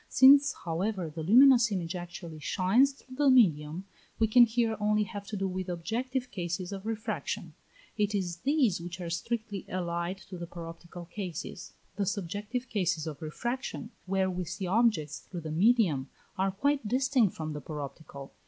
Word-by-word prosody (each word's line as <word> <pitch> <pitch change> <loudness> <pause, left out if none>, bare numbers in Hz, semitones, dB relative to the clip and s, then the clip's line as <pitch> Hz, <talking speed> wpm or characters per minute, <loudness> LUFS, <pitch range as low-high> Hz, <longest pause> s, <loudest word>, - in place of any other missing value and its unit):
Since, 280 +2 +7
however, 175 0 -2
the 160 - -5
luminous 240 - +6
image 175 -3 -2
actually 175 -2 -7
shines 195 - +3
through 260 -1 -14
the 290 -1 +4
medium, 175 - +3 0.3
we 225 - +3
can 240 +3 +7
here 225 -1 +1
only 210 0 +2
have 205 -2 -7
to 210 - -4
do 195 0 -1
with 185 0 -4
objective 245 +9 -3
cases 180 -1 -3
of 195 +1 -6
refraction: 225 -1 -3 0.5
it 210 0 +1
is 175 -4 -2
these 260 - +2
which 175 +1 -7
are 170 -2 -4
strictly 210 +3 -3
allied 175 0 -2
to 185 -2 -7
the 170 - -5
paroptical 170 0 -9
cases. 180 -3 -6 0.2
The 200 -2 0
subjective 205 +6 -3
cases 180 -6 0
of 155 -3 -6
refraction, 235 +8 -4 0.2
where 190 0 +1
we 180 0 -3
see 175 +4 -4
objects 180 -7 +2
through 175 -2 -8
the 155 -1 -5
medium, 175 - +3 0.3
are 190 0 +1
quite 275 +5 0
distinct 255 -3 +2
from 155 -1 -4
the 150 - -6
paroptical. 140 -1 -8
190 Hz, 165 wpm, -30 LUFS, 170-230 Hz, 0.5 s, Since